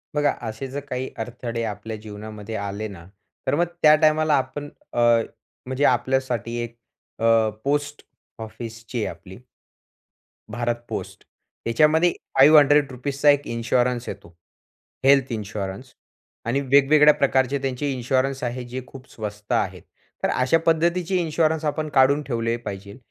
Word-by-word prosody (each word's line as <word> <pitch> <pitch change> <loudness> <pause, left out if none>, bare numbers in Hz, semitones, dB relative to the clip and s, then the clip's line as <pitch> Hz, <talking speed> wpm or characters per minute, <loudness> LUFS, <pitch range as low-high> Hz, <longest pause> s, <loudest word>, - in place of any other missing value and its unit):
बघा, 145 0 +3 0.2
असे 110 +5 -6
जर 135 +2 -5
काही 130 0 -3
अडथळे 115 0 -4
आपल्या 110 0 -5
जीवनामध्ये 105 0 -8
आले 100 +1 -4
ना, 90 -5 -11 0.4
तर - - +2
मग 170 +3 +2 0.2
त्या 155 0 +8
टाईमाला 155 0 +3
आपण 140 +2 -4 0.2
अ, - - -7 0.7
म्हणजे 130 +2 -2
आपल्यासाठी 125 -2 0
एक 120 0 -8 0.4
अ, 115 -1 +4
पोस्ट 145 +1 -1 0.4
ऑफिस 115 0 -8
जी 125 - -4
आहे - - -2
आपली 95 +2 -13 1.1
भारत 120 0 -1
पोस्ट, - - -6 0.4
याच्यामध्ये 155 +8 +4 0.3
₹500 140 -1 +5
एक 145 -1 +5
इन्शुरन्स 120 +1 0
येतो 100 -3 -9 0.8
हेल्थ 135 -1 +5
इन्शुरन्स. 105 +2 -5 0.5
आणि 120 +4 0
वेगवेगळ्या 140 +2 +5
प्रकारचे 135 -1 +1
त्यांचे 135 +1 -2
इन्शुरन्स 130 +2 -1
आहेत, 125 +1 -3
जे 130 +2 -5
खूप 130 -1 -13
स्वस्त 105 -1 -7
आहेत. - - -1 0.4
तर - - +2
अशा 130 +6 +2
पद्धतीचे 170 +3 +1
इन्शुरन्स 160 -2 0
आपण 155 +1 -1
काढून 140 +2 +4
ठेवले 115 -2 -1
पाहिजे. 100 0 -7
130 Hz, 130 wpm, -23 LUFS, 115-145 Hz, 1.1 s, त्या